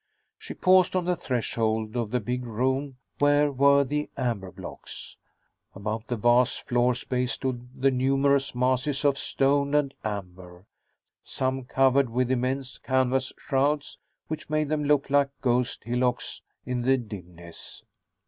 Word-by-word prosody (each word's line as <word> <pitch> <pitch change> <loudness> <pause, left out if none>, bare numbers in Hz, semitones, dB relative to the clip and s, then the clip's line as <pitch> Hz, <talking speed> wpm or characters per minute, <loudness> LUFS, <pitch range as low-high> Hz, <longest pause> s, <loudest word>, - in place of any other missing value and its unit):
She - - -8
paused 185 0 +4
on 180 -2 +1
the 180 0 +1
threshold 110 -4 -1
of 120 -3 -1
the 125 +2 0
big 125 +3 -3
room 130 +4 -1 0.2
where 145 0 +4
were 140 +1 +5
the 150 +2 -2
amber 115 -8 -2
blocks. - - -9 0.6
About 110 +3 -4
the 125 - -1
vast 120 +3 +2
floor 125 -1 +2
space 125 0 -2
stood 125 -2 -4
the 135 +1 +4
numerous 135 +1 +2
masses 130 +3 0
of 140 -1 +4
stone 140 +1 +1
and 140 -2 +2
amber, 90 -3 -6 0.6
some 130 0 -2
covered 135 0 +3
with 125 +2 0
immense 130 +1 -2
canvas 130 0 +1
shrouds 145 +1 0 0.3
which 155 -1 -6
made 155 -1 0
them 150 -1 0
look 145 -1 +2
like 140 -1 +4
ghost 125 -1 0
hillocks 125 +1 -1 0.2
in 125 -1 -2
the 130 +2 +3
dimness. 90 -7 -9
130 Hz, 140 wpm, -26 LUFS, 120-140 Hz, 0.6 s, were